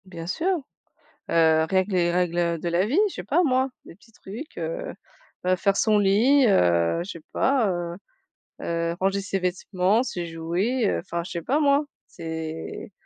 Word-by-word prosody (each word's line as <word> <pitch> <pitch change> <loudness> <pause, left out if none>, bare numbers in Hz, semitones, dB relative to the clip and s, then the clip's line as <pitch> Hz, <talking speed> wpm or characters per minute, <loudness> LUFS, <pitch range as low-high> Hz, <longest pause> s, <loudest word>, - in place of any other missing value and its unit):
Bien 170 -3 -8
sûr. 320 - -2 0.8
Heu, 160 -1 +4
rien 190 -1 +2
que 205 - -11
les 175 -2 +2
règles, 175 -1 0
heu, 170 -1 +1
de 170 - -3
la 175 +3 +1
vie, 275 - +1
je - - -10
sais - - -6
pas 335 +6 +2
moi, 260 -4 +2 0.2
des - - -12
petits 225 +3 -23
trucs, 220 +10 -10
heu - - -4 0.5
heu, 185 0 +3
faire 195 +2 +1
son 215 0 +3
lit, 230 +8 +4
heu, 85 - +3
je 195 - -8
sais 170 - -10
pas, 260 -5 +2
heu 175 -1 -3 0.7
heu, 170 0 -1
ranger 195 +1 +1
ses 195 0 -2
vêtements, 185 +4 +1
ses 175 -9 -4
jouets, 175 +10 -1
heu, - - 0
enfin, 170 -1 -4
je - - -8
sais 170 - -3
pas 275 - +1
moi. 285 0 +3 0.2
C'est 160 +4 -6
185 Hz, 190 wpm, -25 LUFS, 170-230 Hz, 0.8 s, Heu